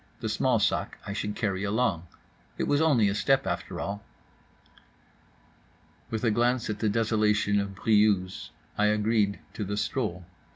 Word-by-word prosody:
The -, -, -3 dB
small -, -, +2 dB
sac -, -, 0 dB
I 100 Hz, -, -4 dB
should 105 Hz, 0 st, -3 dB
carry 100 Hz, -3 st, -1 dB
along—it 100 Hz, -5 st, -3 dB
was 145 Hz, +1 st, +2 dB
only 135 Hz, -10 st, +4 dB
a 100 Hz, -, +1 dB
step, 135 Hz, +4 st, +2 dB
after 90 Hz, -2 st, -3 dB
all. 100 Hz, +1 st, -4 dB, 2.1 s
With 110 Hz, 0 st, -3 dB
a 115 Hz, -, +3 dB
glance 120 Hz, +1 st, +1 dB
at 105 Hz, -, -5 dB
the 110 Hz, -, +1 dB
desolation 105 Hz, -2 st, +2 dB
of 100 Hz, -1 st, -3 dB
Briouse 105 Hz, -3 st, +2 dB, 0.3 s
I 105 Hz, -, +4 dB
agreed 105 Hz, -1 st, +1 dB
to 105 Hz, -, -4 dB
the 105 Hz, +1 st, -3 dB
stroll. 105 Hz, -7 st, -2 dB
105 Hz, 150 wpm, -27 LUFS, 100-110 Hz, 2.1 s, only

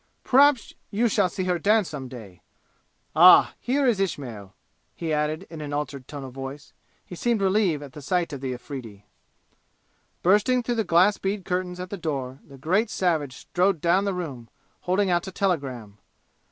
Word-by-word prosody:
Perhaps 275 Hz, -2 st, +4 dB, 0.2 s
you 230 Hz, +4 st, +1 dB
shall 205 Hz, -4 st, +2 dB
see 185 Hz, +2 st, -4 dB
her 180 Hz, -1 st, 0 dB
dance 210 Hz, +2 st, +2 dB
some 135 Hz, -4 st, -6 dB
day! 105 Hz, -9 st, -11 dB, 0.7 s
Ah, 180 Hz, +3 st, +8 dB
here 275 Hz, +3 st, 0 dB
is 235 Hz, -6 st, +2 dB
Ismail," 120 Hz, -, -4 dB, 0.4 s
he 165 Hz, -2 st, -3 dB
added 155 Hz, +4 st, -1 dB
in 160 Hz, -2 st, -9 dB
an 145 Hz, -1 st, -5 dB
altered 145 Hz, -3 st, -4 dB
tone 145 Hz, -2 st, -7 dB
of 130 Hz, -2 st, -9 dB
voice. 135 Hz, +2 st, -8 dB, 0.3 s
He -, -, -11 dB
seemed 235 Hz, +5 st, 0 dB
relieved 190 Hz, -6 st, +1 dB
at 145 Hz, +1 st, -11 dB
sight 175 Hz, 0 st, -1 dB
of 140 Hz, -, -6 dB
the 130 Hz, -1 st, -3 dB
Afridi. 120 Hz, -5 st, -8 dB, 1.2 s
Bursting 210 Hz, +7 st, +3 dB
through 240 Hz, -, -1 dB
the -, -, -1 dB
glass 185 Hz, +3 st, +3 dB
bead 195 Hz, -1 st, -3 dB
curtains 180 Hz, 0 st, -2 dB
at 180 Hz, 0 st, -7 dB
the 200 Hz, -, -4 dB
door, 135 Hz, -6 st, -4 dB
the 140 Hz, -, -15 dB
great 185 Hz, -, +1 dB
savage 155 Hz, -, -1 dB
strode 180 Hz, +3 st, 0 dB
down 175 Hz, +5 st, +2 dB
the 200 Hz, -2 st, -1 dB
room, 135 Hz, -10 st, -6 dB, 0.3 s
holding 185 Hz, +1 st, 0 dB
out 175 Hz, +2 st, 0 dB
a -, -, -5 dB
telegram. 135 Hz, -, -2 dB
170 Hz, 175 wpm, -25 LUFS, 140-195 Hz, 1.2 s, Ah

